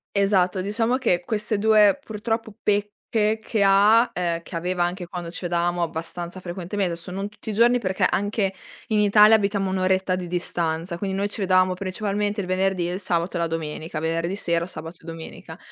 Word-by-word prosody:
Esatto, 195 Hz, -2 st, +2 dB
diciamo 225 Hz, +5 st, 0 dB
che 205 Hz, -9 st, +1 dB
queste 215 Hz, +1 st, -1 dB
2, 215 Hz, +2 st, +5 dB
purtroppo, 225 Hz, 0 st, -3 dB
pecche 210 Hz, +1 st, 0 dB
che 220 Hz, -1 st, -2 dB
ha, 205 Hz, +4 st, +5 dB
uhm, 170 Hz, -2 st, -1 dB
che 170 Hz, -, -10 dB
aveva 175 Hz, +1 st, -1 dB
anche 175 Hz, +1 st, -2 dB
quando 175 Hz, -1 st, -6 dB
c' 170 Hz, -, -7 dB
vedevamo 175 Hz, 0 st, 0 dB
abbastanza 170 Hz, +2 st, -5 dB
frequentement 185 Hz, +2 st, -3 dB
desso 170 Hz, +1 st, -6 dB
non 195 Hz, +2 st, -4 dB
tutti 210 Hz, +1 st, -10 dB
i -, -, -4 dB
giorni 240 Hz, +3 st, +4 dB
perché 190 Hz, -4 st, -2 dB
anche 205 Hz, -1 st, 0 dB, 0.3 s
in 215 Hz, -3 st, +1 dB
Italia 210 Hz, +1 st, +6 dB
abitiamo 200 Hz, -2 st, 0 dB
1 190 Hz, -, -1 dB
oretta 185 Hz, 0 st, +1 dB
di 180 Hz, -1 st, -5 dB
distanza, 170 Hz, -1 st, -2 dB
quindi 190 Hz, +1 st, -3 dB
noi 200 Hz, +1 st, 0 dB
c' 205 Hz, -, -4 dB
vedavamo 185 Hz, -2 st, +3 dB
principalmente 205 Hz, +2 st, -2 dB
il 185 Hz, -, -6 dB
venerdì 185 Hz, -1 st, 0 dB
e -, -, -3 dB
il 185 Hz, -, -3 dB
sabato 175 Hz, -2 st, -1 dB
e -, -, -2 dB
la 170 Hz, -, +1 dB
domenica, 160 Hz, 0 st, -4 dB
venerdì 165 Hz, +3 st, -1 dB
sera, 170 Hz, -4 st, 0 dB
sabato 165 Hz, -1 st, -8 dB
e -, -, -16 dB
domenica. 165 Hz, -1 st, -9 dB
190 Hz, 190 wpm, -24 LUFS, 175-205 Hz, 0.3 s, Italia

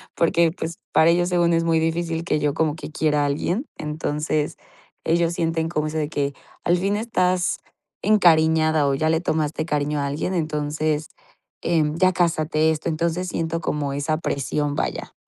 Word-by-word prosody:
porque, 170 Hz, 0 st, +3 dB
pues, 165 Hz, -1 st, -5 dB, 0.2 s
para 160 Hz, +1 st, +5 dB
ellos 175 Hz, +1 st, +2 dB
según 175 Hz, -1 st, +2 dB
es 165 Hz, 0 st, +2 dB
muy 165 Hz, -1 st, +3 dB
difícil 165 Hz, 0 st, -1 dB
que 155 Hz, -, +1 dB
yo 145 Hz, -1 st, 0 dB
como 155 Hz, -2 st, +1 dB
que 155 Hz, -, -8 dB
quiera 150 Hz, -1 st, +1 dB
a -, -, +1 dB
alguien. 175 Hz, -, -1 dB
Entonces, 150 Hz, 0 st, -2 dB, 0.5 s
ellos 170 Hz, 0 st, +2 dB
sienten 165 Hz, -1 st, -1 dB
como 155 Hz, -2 st, -1 dB
eso 155 Hz, -, -4 dB
de 150 Hz, -1 st, -1 dB
que, 140 Hz, -2 st, -1 dB, 0.3 s
al 175 Hz, +1 st, +3 dB
fin 195 Hz, +3 st, 0 dB
estás 185 Hz, -5 st, +1 dB, 0.5 s
encariñada 160 Hz, -6 st, +4 dB
o 140 Hz, -, +2 dB
ya 155 Hz, +3 st, +1 dB
le 160 Hz, 0 st, +2 dB
tomaste 155 Hz, -2 st, -1 dB
cariño 150 Hz, -1 st, -1 dB
a 140 Hz, -, -1 dB
alguien, 150 Hz, +6 st, -2 dB
entonces, 155 Hz, -1 st, -1 dB, 0.6 s
em, 155 Hz, -2 st, +1 dB
ya 185 Hz, +1 st, +4 dB
cásate, 160 Hz, -2 st, +1 dB
esto. 155 Hz, +1 st, -3 dB
Entonces, 170 Hz, +3 st, -1 dB
siento 165 Hz, 0 st, -2 dB
como 145 Hz, -3 st, -2 dB
esa 150 Hz, +2 st, -1 dB
presión, 145 Hz, 0 st, -1 dB
vaya. -, -, -3 dB
160 Hz, 175 wpm, -23 LUFS, 150-170 Hz, 0.6 s, para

